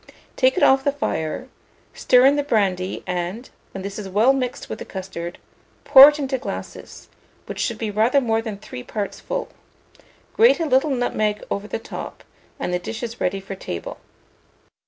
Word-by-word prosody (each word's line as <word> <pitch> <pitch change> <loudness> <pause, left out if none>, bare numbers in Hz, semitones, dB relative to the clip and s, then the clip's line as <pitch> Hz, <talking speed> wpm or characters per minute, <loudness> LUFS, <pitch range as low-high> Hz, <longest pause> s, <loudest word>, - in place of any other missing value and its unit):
Take 260 0 +3
it - - +2
off 270 0 +5
the 285 - +2
fire, 255 - -3 0.5
stir 250 0 +4
in 275 +1 +6
the 290 - +1
brandy, 195 -8 0
and, 180 +6 -4 0.2
when 195 - -7
this 200 +1 -6
is 195 -2 -6
well 220 +8 +4
mixed 255 -2 -3
with - - -6
the - - -5
custard, 185 -2 -7 0.5
pour 280 0 +10
it 300 - -4
into 270 -2 -2
glasses, - - -8 0.4
which - - -7
should 235 - -1
be 220 -2 -3
rather 225 +7 +3
more 225 -4 0
than 220 -3 -6
three 125 -10 -9
parts 205 - -5
full; - - -4 0.8
grate 460 -3 +5
a 330 - 0
little 270 +1 +2
nutmeg 215 -5 -1
over 200 +1 -3
the - - -3
top, 225 - -8 0.4
and 180 - -2
the 180 - 0
dish 220 +6 -6
is 235 0 -6
ready 195 +2 0
for 195 0 -8
table. 90 - -6
225 Hz, 180 wpm, -22 LUFS, 195-265 Hz, 0.8 s, pour